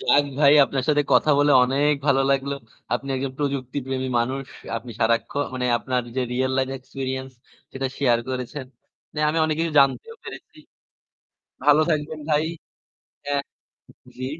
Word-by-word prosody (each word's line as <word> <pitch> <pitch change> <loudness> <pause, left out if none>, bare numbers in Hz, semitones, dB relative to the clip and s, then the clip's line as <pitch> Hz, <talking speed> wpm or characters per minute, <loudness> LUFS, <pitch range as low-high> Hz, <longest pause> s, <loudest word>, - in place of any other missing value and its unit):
যাক 145 +1 +4
ভাই 145 -1 +6
আপনার 135 -1 -2
সাথে 150 -1 +4
কথা 155 - +4
বলে 145 0 +4
অনেক 140 +4 +2
ভালো 135 -2 +4
লাগলো। 140 +1 0 0.4
আপনি 135 +3 -4
একজন 130 0 -3
প্রযুক্তি 140 -2 -2
প্রেমী 130 0 -2
মানুষ। 130 +3 -1 0.3
আপনি 115 +2 -7
সারাক্ষণ 115 +5 +1
মানে 125 -1 -1
আপনার 125 0 -1
যে - - +1
রিয়াল 130 +1 0
লাইফ 130 0 0
এক্সপেরিয়েন্স 130 0 -5 0.4
সেটা 135 0 -2
শেয়ার 120 -4 +3
করেছেন। 130 +2 -4 0.5
না, - - -5
আমি 160 - -1
অনেক 155 -1 0
কিছু 165 -1 -1
জানতেও 140 - +2
পেরেছি। - - -10 1.1
ভালো 150 0 +6
থাকবেন 155 0 -1
ভাই 150 0 +3 0.8
হ্যাঁ, 140 -1 -1 0.7
জ্বি। 130 - -5
135 Hz, 150 wpm, -23 LUFS, 130-145 Hz, 1.1 s, ভাই